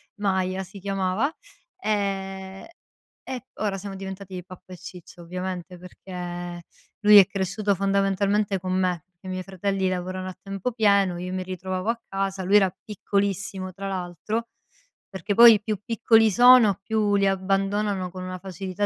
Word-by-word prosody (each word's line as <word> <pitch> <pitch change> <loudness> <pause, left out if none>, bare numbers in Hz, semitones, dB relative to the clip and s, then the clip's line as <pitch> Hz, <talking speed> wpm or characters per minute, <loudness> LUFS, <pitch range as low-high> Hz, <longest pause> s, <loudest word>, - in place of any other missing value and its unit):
Maya, 190 -2 -1
si 195 +2 -12
chiamava; 195 +5 0 0.5
ehm, 195 - -3 0.9
ora 205 -2 -2
siamo 195 0 -7
diventati 190 -1 -7
pappa 185 0 -14
e - - -9
ciccia 180 -1 -12
ovviamente, 180 +1 -5
perché 175 -1 -7 0.4
lui 210 -1 +8
è 195 -2 +9
cresciuto 195 +1 -1
fondamentalmente 195 +1 +1
con 185 0 -4
me, 180 -3 0
che 190 - -12
i - - -5
miei 185 0 -4
fratelli 195 0 -1
lavorano 185 +1 -3
a 185 - -9
tempo 195 +4 -4
pieno, 200 -5 +3
io 180 +1 -5
mi 185 0 -2
ritrovavo 185 +2 -4
a 230 0 -1
casa, 195 0 -2
lui 195 +3 +5
era 190 -3 +3
piccolissimo 200 -2 -2
tra 195 +2 -6
l'altro, 190 +5 -4 0.6
perché 195 +1 -3
poi 230 -2 +9
più 210 -2 -3
piccoli 225 -1 +4
sono, 235 -2 +7
più 215 -1 +1
li 200 0 +3
abbandonano 195 0 0
con 185 -1 -7
una 185 0 -6
facilità 190 +1 -4
195 Hz, 150 wpm, -25 LUFS, 185-200 Hz, 0.9 s, è